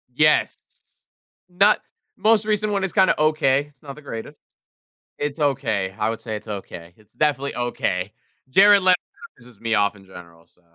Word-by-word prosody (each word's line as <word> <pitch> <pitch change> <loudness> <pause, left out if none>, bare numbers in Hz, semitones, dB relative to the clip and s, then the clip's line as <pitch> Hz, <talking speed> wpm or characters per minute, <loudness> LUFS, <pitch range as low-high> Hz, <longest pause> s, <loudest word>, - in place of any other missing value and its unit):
Yes. 150 +2 +3 0.9
Not 200 +4 +4 0.4
Most 220 -1 +3
recent 215 0 0
one 195 - -1
is 195 - -3
kinda 190 -4 +3
okay, 150 -3 +2
it's 140 -2 -29
not 140 -2 -9
the 150 - -13
greatest, 115 -6 -9 0.8
it's 145 +1 -4
okay, 120 -10 -1
I 110 0 0
would 115 - -4
say 110 -3 -5
it's 105 +1 -9
okay, 90 -4 -8
it's 110 0 -25
definitely 140 -2 -1
okay. 105 -6 -2 0.4
Jared 200 +6 +6
Leto 185 -1 +5 0.4
pisses 120 -4 -17
me 115 -1 0
off 105 0 +1
in 100 -1 -17
general, 85 -3 -15
so 90 - -35
135 Hz, 170 wpm, -22 LUFS, 105-155 Hz, 0.9 s, Jared